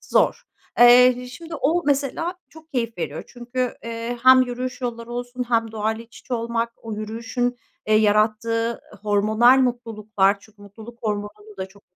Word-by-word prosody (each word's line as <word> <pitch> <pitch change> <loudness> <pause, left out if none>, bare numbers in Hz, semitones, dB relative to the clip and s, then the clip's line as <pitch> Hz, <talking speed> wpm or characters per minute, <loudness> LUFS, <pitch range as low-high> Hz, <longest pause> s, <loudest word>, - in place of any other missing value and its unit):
zor. - - +1 0.4
Eee, 250 +1 +7
şimdi 330 +5 -9
o 325 +4 +1
mesela 290 +5 0
çok 320 +2 -17
keyif 230 -3 -2
veriyor - - -4
çünkü, 245 0 -4
eee, 230 +1 -4
hem 255 0 +8
yürüyüş 250 +1 -4
yolları 235 -1 -5
olsun 245 +1 -4
hem 230 -2 +1
doğayla 220 +1 -2
iç 230 0 -16
içe 250 - -4
olmak, 230 0 -2
o 225 -1 -8
yürüyüşün, 230 +3 -3 0.3
eee, 215 - +3
yarattığı 220 +2 +2 0.2
hormonal 215 +5 +4
mutluluklar. 220 -5 +1
Çünkü 205 0 -19
mutluluk 220 +4 -12
hormonunu 210 -1 -5
da 190 - -4
çok 200 +1 -20
230 Hz, 150 wpm, -23 LUFS, 215-250 Hz, 0.4 s, hem